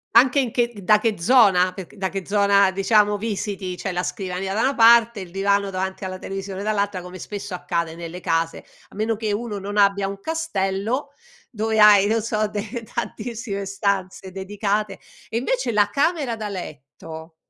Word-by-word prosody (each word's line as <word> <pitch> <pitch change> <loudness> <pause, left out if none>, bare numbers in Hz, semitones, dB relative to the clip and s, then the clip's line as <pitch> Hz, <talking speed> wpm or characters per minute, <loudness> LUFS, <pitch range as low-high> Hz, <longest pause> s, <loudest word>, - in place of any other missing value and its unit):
anche 260 +3 +6
in 250 -4 0
che 240 -1 0
da 210 +3 +5
che 215 -3 -1
zona, 185 -4 +5
perc 190 +1 -10
da 190 -1 -2
che 195 -2 -5
zona, 200 -1 +4
diciamo, 205 +1 +3
visiti. 200 -3 -4
C'è 195 - -4
la 180 0 -2
scrivania 190 0 -3
da 220 - 0
una 270 +2 +1
parte, 235 -1 +6
il 185 -3 -8
divano 200 +1 +1
davanti 190 0 -4
alla 185 0 -5
televisione 195 0 -6
dall'altra, 205 -3 -1
come 180 +1 -10
spesso 200 -1 -6
accade 170 -2 -2
nelle 170 +1 -7
case, 165 -2 -1 0.2
a - - -17
meno 220 +2 0
che 215 -1 -2
uno 210 0 -3
non 205 +2 -5
abbia 200 -1 +3
un 195 0 -6
castello, 250 -4 -2 0.4
dove 220 -1 -1
hai, 205 -1 +7
non 225 +1 +1
so, 215 -1 0
de 210 +3 -5
tantissime 215 -3 -4
stanze 195 -1 -2
dedicate. 200 +2 -2 0.3
E 225 - -2
invece 475 - -1
la 205 -1 +3
camera 280 -1 0
da 215 -1 -5
letto, 160 -2 -9
200 Hz, 175 wpm, -22 LUFS, 190-220 Hz, 0.4 s, hai